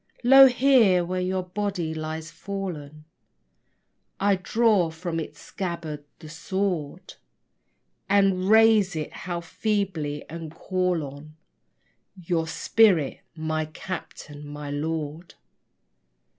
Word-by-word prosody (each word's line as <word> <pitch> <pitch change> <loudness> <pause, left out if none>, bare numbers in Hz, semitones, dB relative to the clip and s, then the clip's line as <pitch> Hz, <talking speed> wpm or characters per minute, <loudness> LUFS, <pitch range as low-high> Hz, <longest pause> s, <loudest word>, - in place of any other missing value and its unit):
Lo 270 +2 +9
here, 245 -9 +4
where 185 +1 -2
your 185 0 -1
body 180 -3 -3
lies 160 +1 -5
fallen, 165 -5 -6 1.1
I 200 0 +3
draw 200 -1 +2
from 165 +1 -4
its 160 - -7
scabbard 170 -5 -5
the 155 - -12
sword 180 0 -3 1.0
And 195 -1 +3
raise 220 -4 +5
it 155 -1 -4
how 175 -1 -5
feebly! 170 -6 -2
and 165 0 -7
call 180 -2 -1
on 145 +2 -10 0.8
Your 165 -2 -1
spirit, 185 -5 +3 0.2
my 155 -1 -2
captain, 155 -3 -8
my 145 0 -7
lord. 155 +2 -4
175 Hz, 105 wpm, -25 LUFS, 155-195 Hz, 1.1 s, Lo